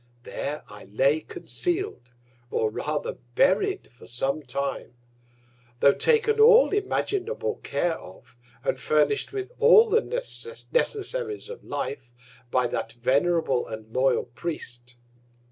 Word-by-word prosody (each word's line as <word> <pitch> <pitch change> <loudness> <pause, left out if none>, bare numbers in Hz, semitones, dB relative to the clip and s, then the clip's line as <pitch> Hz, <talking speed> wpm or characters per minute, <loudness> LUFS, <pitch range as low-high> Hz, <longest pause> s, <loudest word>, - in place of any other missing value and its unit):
There 145 +4 -5
I 105 -1 -12
lay 135 +10 +2
conceal'd, 350 - -3 0.4
or 110 -3 0
rather 150 +6 -3 0.2
buried 390 +8 +2
for 125 - -16
some 135 +5 -1
Time; 135 -2 -4 0.8
tho' 140 - +6
taken 450 -2 +2
all 460 +2 +7
imaginable 415 +3 -1
Care 160 +4 -2
of, 95 +5 -15 0.3
and - - -1
furnish'd 155 +7 +1
with 400 +2 -5
all 465 -1 +7
the 460 - +4
Necessaries 475 -2 0
of 475 - -9
Life 130 -3 -5 0.4
by 125 0 +1
that 115 -1 -3
venerable, 135 +3 +1
and 110 0 -9
loyal 130 +1 +2
Priest. 120 -2 -7
155 Hz, 115 wpm, -25 LUFS, -, 0.8 s, all